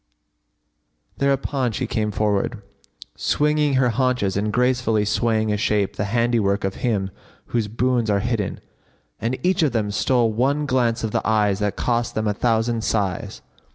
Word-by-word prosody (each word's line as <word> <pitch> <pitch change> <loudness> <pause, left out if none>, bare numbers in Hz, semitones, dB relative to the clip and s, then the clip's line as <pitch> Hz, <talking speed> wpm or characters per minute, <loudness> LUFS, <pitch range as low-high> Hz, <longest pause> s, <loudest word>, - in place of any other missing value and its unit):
"[FN#59] - - -26
Thereupon 135 -2 0
she 130 - -2
came 110 -2 -1
forward, 105 +1 -1 0.5
swinging 150 -1 +1
her 130 -1 +3
haunches 120 -5 0
and 105 +2 0
gracefully 125 -3 +1
swaying 110 0 +1
a - - 0
shape 105 -3 0
the 105 - -2
handiwork 115 -2 +1
of 95 0 -2
Him 100 -6 0 0.4
whose 115 -3 +1
boons 120 +1 0
are 100 -1 +2
hidden; 115 -4 -2 0.6
and 120 +4 -1
each 185 0 +2
of 150 -6 +2
them 105 -3 0
stole 115 +1 +1
one 140 +6 +1
glance 120 -4 +1
of 110 - -1
the - - 0
eyes 105 -2 +2
that 105 -1 -1
cost 120 -1 -1
them 110 0 -1
a 105 - +1
thousand 115 +1 0
sighs. 100 -6 -2
115 Hz, 160 wpm, -22 LUFS, 105-125 Hz, 0.6 s, her